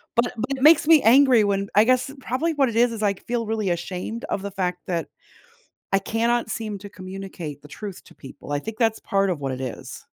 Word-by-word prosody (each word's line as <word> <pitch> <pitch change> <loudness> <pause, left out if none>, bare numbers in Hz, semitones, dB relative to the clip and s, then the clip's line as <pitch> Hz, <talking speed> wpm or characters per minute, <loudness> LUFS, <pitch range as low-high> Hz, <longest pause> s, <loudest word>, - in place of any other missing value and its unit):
but 235 +1 +4
it - - -8
but 250 +5 -3
it 260 - -4
makes 315 0 +7
me 320 -3 +7
angry 250 -1 +6
when 200 0 0
I 210 - +7
guess, 255 +2 +2
probably 315 +6 -1
what 275 -4 +2
it 225 - -6
is 240 0 +4
is 220 -2 -5
I 200 -1 +3
c - - -17
feel 235 -1 -1
really 215 -3 -1
ashamed 180 +6 -4
of 190 - -3
the 200 0 -5
fact 180 -2 -2
that 170 -2 -2 0.9
I 195 - +5
cannot 230 +3 0
seem 215 -2 -4
to 205 -1 -10
communicate 185 -6 -8
the 145 - -13
truth 195 +6 -8
to - - -18
people. 140 +1 -10
I 145 - +1
think 220 +7 -7
that's 225 -2 +2
part 195 -2 +1
of 160 -5 -3
what 135 -1 -2
it 130 +1 -5
is. 125 - -7
210 Hz, 240 wpm, -23 LUFS, 185-235 Hz, 0.9 s, makes